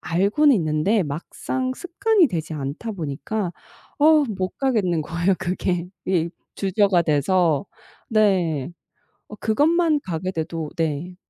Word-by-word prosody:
알고는 205 Hz, -, +3 dB
있는데 165 Hz, +6 st, +1 dB
막상 215 Hz, -, -3 dB
습관이 360 Hz, +2 st, +2 dB
되지 160 Hz, -4 st, -4 dB
않다 150 Hz, +10 st, -4 dB
보니까 175 Hz, +3 st, -3 dB, 0.5 s
어우 305 Hz, 0 st, +5 dB
못 185 Hz, 0 st, -3 dB
가겠는 205 Hz, -, +1 dB
거예요 170 Hz, +5 st, 0 dB
그게. 180 Hz, -1 st, -1 dB, 0.2 s
이 170 Hz, -3 st, +1 dB, 0.3 s
주저가 195 Hz, -2 st, +2 dB
돼서. 155 Hz, 0 st, +2 dB, 0.4 s
네. 180 Hz, -, +2 dB, 0.6 s
어 210 Hz, -, -9 dB
그것만 305 Hz, +9 st, +2 dB
가게 185 Hz, -, -3 dB
돼도 160 Hz, -2 st, -4 dB
네. 165 Hz, +2 st, -2 dB
185 Hz, 240 characters per minute, -23 LUFS, 160-220 Hz, 0.6 s, 어우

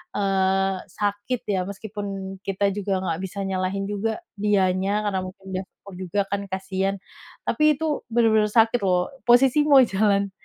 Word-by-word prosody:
eee, 195 Hz, -1 st, +1 dB, 0.2 s
sakit 205 Hz, +6 st, -2 dB
ya. 190 Hz, -2 st, +1 dB
Meskipun 195 Hz, -2 st, -6 dB
kita 200 Hz, +1 st, 0 dB
juga 195 Hz, -2 st, -1 dB
nggak 165 Hz, -2 st, -2 dB
bisa 190 Hz, +1 st, -6 dB
nyalahin 195 Hz, +1 st, -2 dB
juga 220 Hz, -, -2 dB, 0.2 s
dianya, 200 Hz, 0 st, +1 dB
karena 195 Hz, -2 st, 0 dB
mungkin 190 Hz, +1 st, -11 dB
dia 185 Hz, -, -2 dB, 0.2 s
fokus 200 Hz, -2 st, -11 dB
juga 185 Hz, +2 st, -2 dB
kan 200 Hz, 0 st, 0 dB
kasihan, 190 Hz, +1 st, -1 dB, 0.5 s
tapi 305 Hz, 0 st, +3 dB
itu 320 Hz, -, -2 dB, 0.3 s
bener-bener 220 Hz, -2 st, +4 dB
sakit 225 Hz, +2 st, +4 dB
loh. 180 Hz, +6 st, +1 dB, 0.2 s
Posisi 255 Hz, +4 st, +5 dB
mau 280 Hz, -3 st, +8 dB
jalan, 200 Hz, -2 st, +1 dB
200 Hz, 150 wpm, -24 LUFS, 190-210 Hz, 0.5 s, mau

